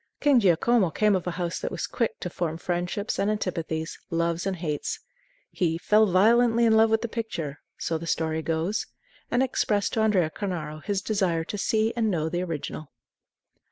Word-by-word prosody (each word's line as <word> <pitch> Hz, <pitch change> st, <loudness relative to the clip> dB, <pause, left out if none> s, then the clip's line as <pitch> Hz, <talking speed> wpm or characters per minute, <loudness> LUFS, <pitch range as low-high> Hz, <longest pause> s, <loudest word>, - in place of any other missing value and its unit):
King 285 Hz, -4 st, +5 dB
Giacomo 200 Hz, +1 st, +3 dB
came 210 Hz, +4 st, +2 dB
of 185 Hz, -1 st, -2 dB
a 180 Hz, -, -3 dB
house 175 Hz, -1 st, -2 dB
that -, -, -3 dB
was -, -, -3 dB
quick 230 Hz, -3 st, -2 dB
to 180 Hz, -, -3 dB
form 165 Hz, -2 st, -2 dB
friendships 180 Hz, +4 st, -2 dB
and 200 Hz, -, +2 dB
antipathies, 165 Hz, -6 st, -3 dB
loves 170 Hz, +2 st, 0 dB
and 195 Hz, -, -1 dB
hates. 155 Hz, -4 st, -3 dB, 0.5 s
He 165 Hz, -3 st, 0 dB
"fell 215 Hz, +5 st, +4 dB
violently 230 Hz, +5 st, +4 dB
in 225 Hz, -, +5 dB
love 220 Hz, 0 st, +5 dB
with 220 Hz, +1 st, +1 dB
the -, -, 0 dB
picture," 205 Hz, -11 st, -4 dB, 0.2 s
so 165 Hz, -1 st, -2 dB
the 165 Hz, -, -7 dB
story 160 Hz, -1 st, 0 dB
goes, 165 Hz, +6 st, -1 dB, 0.4 s
and 245 Hz, +2 st, +2 dB
expressed 210 Hz, -5 st, 0 dB
to -, -, 0 dB
Andrea 190 Hz, -7 st, +2 dB
Cornaro 155 Hz, -7 st, -4 dB
his 200 Hz, -1 st, -1 dB
desire 185 Hz, -6 st, 0 dB
to 185 Hz, -, -6 dB
see 220 Hz, +2 st, +1 dB
and 225 Hz, -2 st, +1 dB
know 160 Hz, -4 st, 0 dB
the 175 Hz, +2 st, -1 dB
original. 155 Hz, -3 st, -5 dB
185 Hz, 185 wpm, -26 LUFS, 165-220 Hz, 0.5 s, King